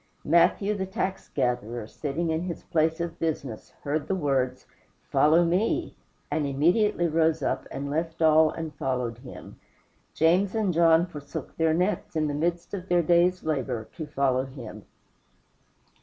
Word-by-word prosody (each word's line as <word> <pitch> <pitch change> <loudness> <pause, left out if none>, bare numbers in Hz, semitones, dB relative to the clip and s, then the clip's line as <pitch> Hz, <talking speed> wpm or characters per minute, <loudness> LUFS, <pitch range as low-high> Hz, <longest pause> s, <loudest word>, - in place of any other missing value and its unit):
Matthew, 195 +4 +3
the 190 -2 -3
tax 190 -1 -3
gatherer, 120 -3 -2
sitting 155 +8 -3
in 160 +1 0
his 175 -1 -5
place 160 0 +1
of 170 -1 -4
business, 140 -8 -3
heard 145 +1 -2
the 190 - 0
words, 135 -6 -1 0.5
"Follow 165 +3 +5
me," 225 - 0 0.4
and 150 -2 0
immediately 175 +7 +2
rose 160 -1 +1
up, - - -1
and 140 +1 -5
left 160 +3 -3
all 160 -1 +5
and 160 -1 -6
followed 125 -3 -2
him. 125 0 -11 0.6
James 180 +6 +3
and 210 -5 +1
John 165 0 +5
forsook 150 -5 -8
their 160 -1 +2
nets, 180 +1 -1
in 155 -1 +1
the 145 - -2
midst 170 +5 -2
of 190 -2 -6
their 175 -1 +3
day's 175 +2 +3
labor, 130 -7 -2
to 155 -3 -6
follow 135 -3 +1
him. 120 -6 -10
160 Hz, 155 wpm, -26 LUFS, 140-175 Hz, 0.6 s, Follow